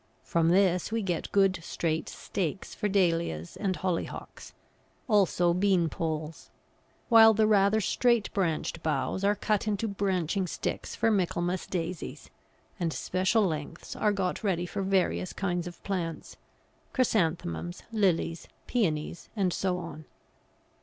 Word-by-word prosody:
From 165 -1 +2
this 185 0 +3
we 225 -1 0
get 175 -4 -2
good 195 -2 +3
straight 160 -1 -2
stakes 190 -1 -4
for 210 - -2
Dahlias 170 - 0
and 190 -3 -1
Hollyhocks, 180 -3 -4 0.6
also 185 -5 +3
beanpoles; 165 -4 0 0.6
while 225 -2 +8
the 215 0 +4
rather 210 0 +4
straight 235 +2 +2
branched 165 -3 -1
boughs 150 +4 -1
are 205 +1 +3
cut 210 +1 0
into 210 +1 0
branching 190 -2 0
sticks - - -4
for 225 - +2
Michaelmas 180 -2 0
Daisies, 175 -1 -5 0.5
and 170 -2 0
special 190 +7 +1
lengths 155 -5 -4
are 210 - +2
got 195 -1 -2
ready 180 -4 0
for 195 +3 -4
various 190 -1 +1
kinds 180 -2 -2
of 175 - -10
plants 175 -5 -4 0.6
Chrysanthemums, 160 - 0
Lilies, 180 -6 +1 0.2
Pæonies 170 -8 -1
and 190 -4 +1
so 185 -2 0
on. 165 -3 -8
185 Hz, 125 wpm, -29 LUFS, 165-200 Hz, 0.6 s, while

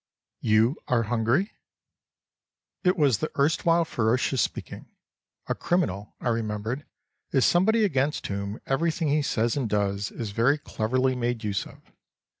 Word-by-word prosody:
"You 110 +6 +3
are 120 -2 +2
hungry?" 120 - +1 1.3
It 185 0 +3
was 140 -9 +3
the 155 - -2
erstwhile 165 +4 +3
ferocious 125 +1 +1
speaking. - - -4 0.6
A - - -1
criminal, 105 - -1
I 125 - -1
remembered, 115 +4 -2 0.4
is 135 - +3
somebody 215 +5 +4
against 145 -5 0
whom 100 +1 -4
everything 160 +3 0
he 150 +1 +2
says 120 -4 0
and 130 -6 -1
does 100 0 0
is 110 -4 -5
very 120 +8 +3
cleverly 130 0 0
made 120 -1 -2
use 100 -2 -2
of. - - -16
125 Hz, 135 wpm, -26 LUFS, 110-150 Hz, 1.3 s, somebody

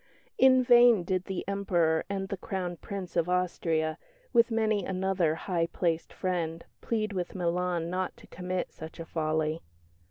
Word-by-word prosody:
In 260 -1 +6
vain 240 -5 +6
did 185 +1 -1
the 190 -2 -4
Emperor 175 -5 +1
and 195 -1 -2
the 195 - -3
Crown 180 -2 -3
Prince 190 +1 -7
of 170 0 +1
Austria, 165 -3 0 0.3
with 235 -1 +5
many 220 -3 +1
another 185 -4 0
high 170 -1 -1
placed 170 -1 -1
friend, 170 -3 -2 0.2
plead 215 -2 -1
with 180 -1 -3
Milan 175 -1 0
not 185 0 -2
to - - -15
commit 180 0 -4
such 160 +2 -10
a 165 - -5
folly. 155 0 -1
180 Hz, 155 wpm, -29 LUFS, 165-195 Hz, 0.3 s, In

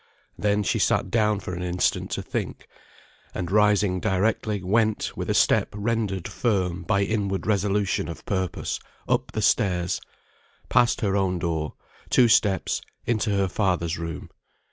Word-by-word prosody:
Then 105 0 +1
she - - 0
sat 95 - +1
down 105 -3 +2
for 90 - -5
an 90 - -4
instant 90 0 0
to - - -3
think; - - -4 0.7
and 90 0 -3
rising 105 -2 +3
directly, 105 +1 0
went, 110 +3 +1
with - - -4
a - - +1
step - - +3
rendered 105 -4 -1
firm 95 -6 -1
by 100 +3 +1
inward 100 -2 -1
resolution 100 -3 +1
of 85 - -8
purpose, 95 -3 -2 0.3
up - - 0
the - - -1
stairs; 90 -2 +1 0.7
passed 125 -1 +3
her 100 -3 +1
own 95 -2 +1
door, 80 -3 -2 0.3
two 125 - +5
steps, 100 -5 +2 0.2
into 110 -1 0
her 100 -1 +2
father's 90 -4 0
room. 80 -2 -6
100 Hz, 145 wpm, -25 LUFS, 90-105 Hz, 0.7 s, two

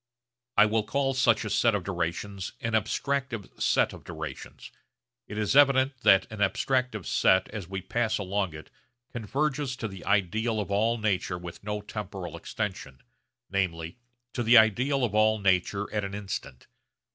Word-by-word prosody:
I - - +8
will 110 +1 +1
call 135 +6 0
such 120 -4 +3
a - - -3
set 115 -3 +3
of 100 - -2
durations 90 +2 -3
an 115 - -3
'abstractive 115 +1 -2
set' - - +2
of - - -11
durations. - - -8 0.6
It 105 - -7
is 105 +4 0
evident 135 -2 +5
that 95 -3 +5
an 105 - -7
abstractive 110 - 0
set 95 0 +3
as 105 -5 -6
we 95 0 -4
pass 110 +2 0
along 95 -3 -2
it 75 - -11 0.4
converges 135 +4 -1
to 115 - -4
the 95 -2 -10
ideal 110 +3 +1
of 100 -1 -4
all 110 +4 +2
nature 100 -4 -1
with 90 +1 -9
no 105 0 -3
temporal 100 -5 -6
extension, 85 - -5 0.5
namely, 85 -1 -2 0.3
to 120 - -2
the 120 +1 +6
ideal 125 +5 +4
of 115 -4 0
all 110 0 +4
nature 100 0 +1
at 105 -1 0
an 100 0 -4
instant. 95 -10 -6
105 Hz, 160 wpm, -28 LUFS, 95-120 Hz, 0.6 s, I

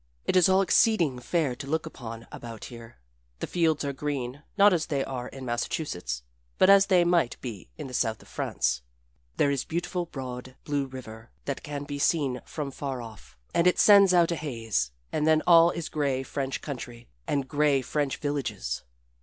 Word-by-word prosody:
It - - 0
is 185 0 +6
all 190 +1 +5
exceeding 175 - +3
fair 145 +1 0
to 135 - -8
look 160 +2 -1
upon 115 -2 -8
about 115 -2 -8
here. 115 - -11 0.4
The - - -3
fields 160 -4 +1
are 140 - -2
green, 135 -1 -4 0.2
not 205 -1 +7
as 165 -2 0
they 140 -5 0
are 125 -2 -5
in 135 -1 -9
Massachusetts, 115 - -3 0.3
but 190 - +6
as 200 0 +7
they 180 -2 +5
might 170 -7 +2
be 105 - -7
in - - -6
the 130 - -8
south 110 -3 0
of - - -19
France. - - -1 0.6
There 140 - +3
is 140 -2 0
a - - -25
beautiful, 175 +1 -2
broad, 130 -3 -7
blue 145 -2 -1
river 115 -3 -10 0.2
that 140 - -3
can 145 -1 -5
be 145 0 -5
seen 140 -5 +1
from 145 -3 -4
far 135 -1 -4
off, 110 - -11 0.2
and 170 - +3
it 180 - +4
sends 200 -2 +7
out 175 -2 +4
a - - +1
haze 115 - -2 0.2
and 155 0 0
then 155 0 +4
all 170 -1 +7
is 170 -2 -4
gray 140 -3 -1
French 135 0 -3
country, 120 -4 -7 0.2
and 140 -2 0
gray 145 -2 +2
French 145 +1 -1
villages. 135 - -3
140 Hz, 190 wpm, -27 LUFS, 125-165 Hz, 0.6 s, not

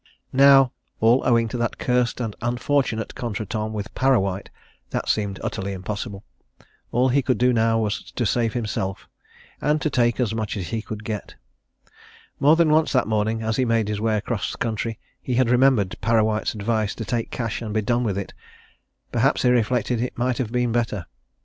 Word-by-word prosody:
Now 135 -1 +7 0.3
all 115 +4 +4
owing 115 -1 +3
to 120 - -4
that 120 -1 -1
cursed 125 -1 0
and 115 -4 -3
unfortunate 120 -1 0
contretemps 110 -1 -4
with 105 0 -5
Parrawhite, 100 -8 +1 0.4
that - - -3
seemed 100 -2 0
utterly 100 +1 -3
impossible 100 +2 -5 0.7
all 125 +2 +3
he 140 +3 +3
could 130 -1 0
do 125 +1 +3
now 115 -1 +2
was 110 +2 -2
to 120 - -1
save 115 +2 +1
himself 105 -5 -3 0.5
and 150 +1 +2
to 155 - -1
take 120 -2 +2
as 115 -4 +1
much 110 -2 -3
as 90 -3 -4
he 115 -1 -2
could 110 0 -7
get. 105 -2 -5 1.0
More 145 +3 +6
than 165 -2 +3
once 155 +1 +3
that 130 - +2
morning, 110 +1 0
as 110 0 -1
he 130 - +2
made 115 -3 +1
his 105 -1 -2
way 110 -1 +1
across 105 -1 -3
country, 115 -1 -2 0.2
he 125 - -2
had 125 -1 +3
remembered 125 -7 +3
Parrawhite's 110 0 +1
advice 110 0 -1
to 115 - -5
take 115 +4 -2
cash 115 -2 -3
and 110 -2 -5
be 110 0 0
done 120 +2 +1
with 100 -5 -1
it 100 - -5 0.8
perhaps, 125 +3 +2
he 125 - +4
reflected, 120 0 +1
it 125 - -3
might 125 0 0
have 115 -4 -2
been 125 -1 +1
better. 110 -6 -1
115 Hz, 185 wpm, -23 LUFS, 105-125 Hz, 1.0 s, Now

